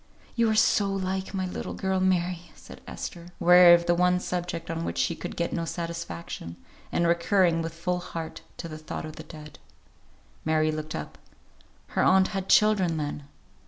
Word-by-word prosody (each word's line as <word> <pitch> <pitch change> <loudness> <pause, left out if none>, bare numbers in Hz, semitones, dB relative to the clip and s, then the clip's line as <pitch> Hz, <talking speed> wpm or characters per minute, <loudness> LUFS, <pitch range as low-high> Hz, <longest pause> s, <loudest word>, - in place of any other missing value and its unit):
"You 230 -1 +3
are 220 - +1
so 205 -2 +3
like 190 0 -2
my 190 -1 -1
little 185 - -5
girl, 190 0 -1
Mary!" 180 -2 0
said - - -13
Esther, 170 -1 -7
weary 175 0 +8
of 170 0 -1
the 175 - +3
one 180 +1 +3
subject 175 -2 -4
on 165 0 -3
which 85 - -4
she 85 0 +1
could - - -7
get 170 - -2
no 170 - -1
satisfaction, 170 - -5 0.4
and 170 - +1
recurring, 170 0 +3
with 165 0 -5
full 180 +2 -1
heart, 165 -2 -7 0.2
to 170 - -6
the 155 -1 -8
thought 155 - -6
of 155 - -9
the - - -6
dead. 150 -2 -12 0.8
Mary 155 0 +2
looked 155 0 -5
up. - - -7 0.7
Her - - 0
aunt 190 0 +4
had 195 -2 -4
children, 195 -6 +4
then. 145 -1 -4
170 Hz, 180 wpm, -27 LUFS, 165-185 Hz, 0.8 s, weary